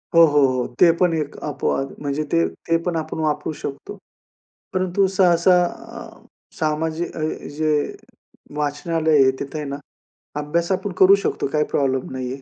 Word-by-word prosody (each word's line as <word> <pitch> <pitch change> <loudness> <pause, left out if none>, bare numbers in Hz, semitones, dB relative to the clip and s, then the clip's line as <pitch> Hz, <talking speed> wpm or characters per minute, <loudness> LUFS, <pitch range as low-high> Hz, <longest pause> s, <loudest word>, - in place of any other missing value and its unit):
हो, 165 0 +9
हो, 145 -2 +4
हो. 130 -1 -1
ते 170 -2 +7
पण 180 -2 +3
एक 150 -2 -4
अपवाद 135 -2 -2
म्हणजे 145 +1 -2
ते 85 0 +3
ते 165 - -1
पण 175 -2 -2
आपण 160 0 -4
वापरू 150 0 -1
शकतो. 140 -1 -7 0.8
परंतु 185 +1 +1
सहसा 180 -1 +4
अ, 230 +4 -9 0.3
सामाजिक 160 +2 -2
अ, - - -4 0.4
जे 155 -1 +1 0.9
वाचनालय 155 0 +1
आहे, 130 - +4
तिथं 140 - -6
आहे 150 - -4
ना, 140 - -4 0.6
अभ्यास 170 +5 -1
आपण 190 +1 -1
करू 195 +1 +8
शकतो - - -1
काही 150 0 +3
प्रॉब्लेम 135 -2 0
नाही 130 -1 -4
आहे. 135 - -9
155 Hz, 160 wpm, -21 LUFS, 145-175 Hz, 0.9 s, हो